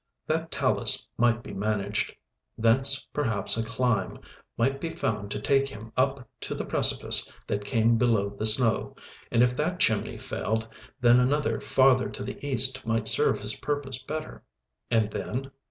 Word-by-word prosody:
That 160 +1 -2
talus - - +1
might 120 -1 +1
be - - -9
managed. 105 0 -2 0.4
Thence 130 +4 +1
perhaps 115 -8 0
a 115 - -1
climb 115 -4 -1 0.4
might 135 +3 0
be 165 - -3
found 105 -12 -3
to 105 - -3
take 135 +5 +2
him 115 -4 -10
up 135 0 0
to - - -4
the - - -4
precipice - - +3
that 100 0 -3
came 115 -1 +2
below 110 -5 +1
the 110 +2 0
snow; 110 +1 +5 0.4
and 115 - +4
if 125 0 +1
that 175 +4 -1
chimney 110 -2 0
failed, 110 +1 -3 0.3
then 120 0 +6
another 145 +4 0
farther 130 -1 +3
to - - -7
the - - -8
east 135 -2 +1
might 115 -1 -1
serve - - +2
his - - -2
purpose 140 -4 -3
better. 155 +4 -6 0.5
And 115 -2 +2
then? 135 +5 -5
120 Hz, 160 wpm, -26 LUFS, 110-135 Hz, 0.5 s, then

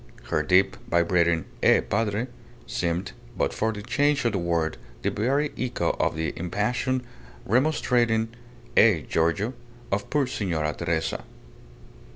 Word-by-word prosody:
Her 75 - +2
deep, 95 +5 +3
vibrating 85 -1 +2 0.2
"Eh, - - +6
Padre?" 110 +1 0 0.4
seemed, 85 +2 -2 0.3
but - - +1
for 110 +1 0
the 105 -2 -7
change 145 +4 +1
of 120 - +3
the 100 - -1
word, 85 -2 0 0.3
the - - +1
very 140 +7 +1
echo 125 -1 0
of - - +1
the 80 -2 -2
impassioned, 120 +8 -1 0.4
remonstrating 120 -3 +2 0.5
"Eh, 105 -8 +6
Giorgio?" 85 +9 +1 0.4
of 100 +1 -1
poor 145 -1 +2
Signora 80 -10 -1
Teresa. 80 +1 -2
105 Hz, 130 wpm, -26 LUFS, 85-120 Hz, 0.5 s, Eh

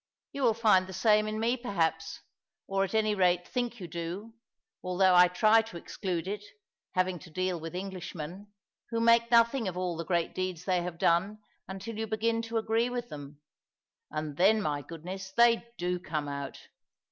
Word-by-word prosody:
You 280 - -5
will 235 -4 +3
find 210 -5 +4
the 190 - -8
same 215 +3 +3
in 215 0 -3
me 235 +3 +2
perhaps, 165 -9 -2 0.4
or, 195 0 0
at 195 +2 -3
any 215 -1 +3
rate, 180 -2 +2
think 245 -2 -3
you 180 - -6
do, 170 +6 -6 0.5
although 185 +1 +3
I 180 0 +8
try 215 +5 +4
to 225 -6 -9
exclude 175 0 -4
it, 205 +1 -4 0.5
having 185 -1 +1
to 180 - -13
deal 185 +1 -1
with 165 +2 -7
Englishmen, 185 -1 -6 0.4
who 230 - -1
make 230 0 +4
nothing 235 0 +4
of 180 -1 -4
all 180 -2 -1
the 165 - -4
great 170 0 0
deeds 185 -2 -3
they 185 -2 +1
have 175 -1 -5
done 175 +6 +2 0.3
until 200 +4 -6
you 220 - -2
begin 225 +1 0
to 230 0 -3
agree 225 +2 +1
with 245 -1 -4
them. 145 0 -9 0.7
And 155 -1 -4
then, 205 +5 +5
my 150 -7 -1
goodness, 180 +5 -8
they 235 0 +5
do 180 -1 -1
come 155 -4 -3
out! 140 -1 -5
190 Hz, 180 wpm, -30 LUFS, 175-220 Hz, 0.7 s, I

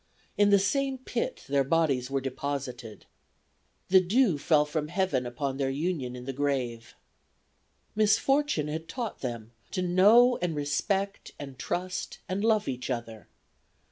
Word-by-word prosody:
In 205 0 +4
the 200 - +6
same 270 +7 0
pit 255 0 -4
their 140 0 +2
bodies 135 -4 +1
were 135 0 -1
deposited. 130 -4 -5 0.8
The 190 0 +7
dew 190 - +2
fell 150 0 +3
from 150 0 -3
Heaven 155 -9 0
upon 135 +2 -3
their 135 -1 0
union 140 -3 -2
in 125 0 -8
the 135 - -4
grave. 130 -4 -2 1.0
"Misfortune 215 - +2
had 160 +2 -5
taught 240 -4 -4
them 115 -3 -5 0.2
to 185 - -2
know 210 +8 +5
and 175 -3 -1
respect 195 +8 -2
and 135 -3 -9
trust 180 +1 -3
and 190 +2 -2
love 220 -2 +2
each 125 -1 -4
other. 115 -3 -5
150 Hz, 140 wpm, -28 LUFS, 135-200 Hz, 1.0 s, The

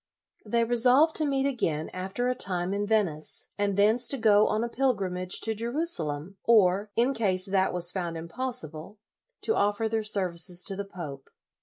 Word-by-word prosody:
They 230 +2 0
resolved 250 +7 +4
to 310 - +1
meet 270 -1 0
again 165 - -1
after 190 +7 -3
a 250 - +1
time 185 -6 0
in 205 +1 -2
Venice, 190 -9 -1
and 200 -1 -1
thence 220 +4 +4
to 275 - +2
go 215 -3 +4
on 215 +2 0
a - - -1
pilgrimage 195 -8 -1
to 225 - 0
Jerusalem, 200 - -2
or, 205 -2 +3
in 245 +4 +2
case 190 -6 +1
that 190 -1 +1
was 175 -1 +1
found 175 -3 -4
impossible, 175 - -5 0.4
to 445 - 0
offer 205 +2 +1
their 220 0 -1
services 180 -4 -1
to 195 - -2
the 200 +1 -5
pope. 150 -8 -9
205 Hz, 170 wpm, -27 LUFS, 180-235 Hz, 0.4 s, resolved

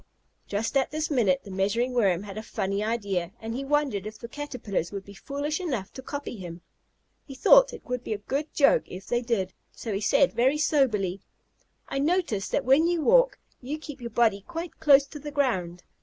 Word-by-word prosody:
Just 210 +6 -2
at 265 - +2
this 310 +1 -2
minute 215 -10 +2
the 200 - -10
Measuring 205 +7 0
Worm 195 -6 +2
had 200 -2 -8
a 215 - -4
funny 200 -2 -2
idea, 200 -6 -1
and 225 0 -5
he 265 +3 -3
wondered 275 -8 0
if 215 - -8
the 235 - -8
Caterpillars 235 - -4
would 200 -1 -6
be 200 - -11
foolish 285 - -3
enough 255 - -3
to 260 - -8
copy 285 -1 -5
him. 175 -2 -8 0.7
He 270 - -9
thought - - +6
it - - -10
would 250 -1 -3
be - - -2
a - - -3
good 275 +9 -3
joke 280 -2 +4
if 190 +1 -9
they 240 0 0
did, 220 -6 -1 0.2
so 225 - -5
he 195 - -2
said 275 +5 +3
very 260 +5 +3
soberly, 215 - +1 0.7
"I 275 - -2
notice 295 - 0
that - - 0
when 275 +6 +5
you 345 -2 0
walk - - +5 0.2
you 275 +5 -4
keep 295 -3 -9
your 235 - -5
body 225 -3 +2
quite 335 0 -6
close 280 -2 +6
to 295 +2 -10
the 295 +1 -6
ground. 190 -12 -1
245 Hz, 205 wpm, -27 LUFS, 200-290 Hz, 0.7 s, thought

